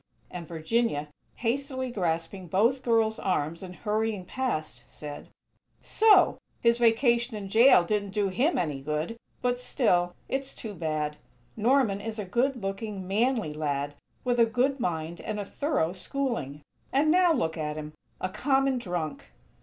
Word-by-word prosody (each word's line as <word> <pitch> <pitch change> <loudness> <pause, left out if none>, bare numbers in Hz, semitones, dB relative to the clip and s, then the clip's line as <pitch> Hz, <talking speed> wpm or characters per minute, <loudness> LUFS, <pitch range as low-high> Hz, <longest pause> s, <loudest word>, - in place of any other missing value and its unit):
and 170 -2 -7
Virginia, 160 -1 0 0.3
hastily 260 +1 -2
grasping 175 -1 -2
both 230 +10 +2
girls' 225 -3 +2
arms 170 -3 -1
and 180 -1 -8
hurrying 215 -2 -1
past, 155 - -3
said: 145 -1 -8 0.5
"So!! 420 -4 +5 0.2
His 235 0 +3
vacation 235 0 +3
in 200 -2 -6
jail 225 -2 +7
didn't 205 +2 -1
do 200 0 0
him 265 - +1
any 150 -6 -1
good! 150 +9 -2 0.3
But, 245 0 +1
still, 180 -9 +2
it's 270 0 -3
too 220 -2 -7
bad. 155 -3 -2 0.4
Norman 225 -3 +2
is 225 0 -5
a 210 - -3
good 245 +4 0
looking, 195 -1 -4
manly 220 - +1
lad, 145 -1 -2 0.3
with 245 -1 +1
a 230 - +7
good 255 +5 +1
mind 165 -4 -2
and 215 -1 -4
a 205 - -3
thorough 260 - -1
schooling. 190 - -3 0.3
And 295 +3 +3
now 360 0 +5
look 165 - 0
at 150 -1 -3
him! 155 0 -6 0.3
A - - -1
_common 270 +4 +1
drunk!! 175 - -4
210 Hz, 150 wpm, -28 LUFS, 165-245 Hz, 0.5 s, jail